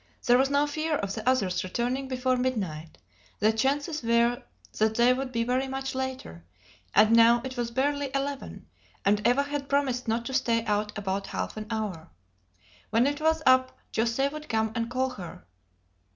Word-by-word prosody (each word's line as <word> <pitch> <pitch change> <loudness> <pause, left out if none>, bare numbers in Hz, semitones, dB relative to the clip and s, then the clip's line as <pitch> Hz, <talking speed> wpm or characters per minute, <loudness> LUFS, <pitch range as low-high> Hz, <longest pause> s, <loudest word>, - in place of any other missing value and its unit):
There 245 0 +5
was 270 +1 +3
no 285 +1 +3
fear 310 +1 -1
of 200 -7 -3
the 255 - -1
others 190 -8 +1
returning 245 +8 -2
before 255 0 0
midnight; 195 -12 -3 0.4
the 215 +1 +3
chances 285 +7 0
were 235 +1 +2 0.4
that 220 0 +2
they 240 +2 +5
would 260 0 -4
be 230 -1 0
very 255 +3 0
much 270 0 -4
later; 260 - -5 0.5
and 215 +1 +6
now 230 +1 +6
it 260 -1 -5
was 240 -2 -2
barely 280 +3 0
eleven, 275 0 -4 0.4
and 205 +1 +3
Eva 250 +4 +3
had 285 -1 -4
promised 260 -3 0
not 230 +1 -1
to 265 - -5
stay 235 -3 +1
out 210 0 -1
above 195 -1 -3
half - - -4
an 215 0 -6
hour. 210 -8 -4 0.8
When 225 +3 +3
it 290 +2 -1
was 320 0 +2
up 255 0 +4 0.2
José 235 +5 +1
would 305 0 -8
come 220 -1 0
and 230 -1 -2
call 260 +1 0
her. 180 - -9
245 Hz, 180 wpm, -27 LUFS, 220-270 Hz, 0.8 s, and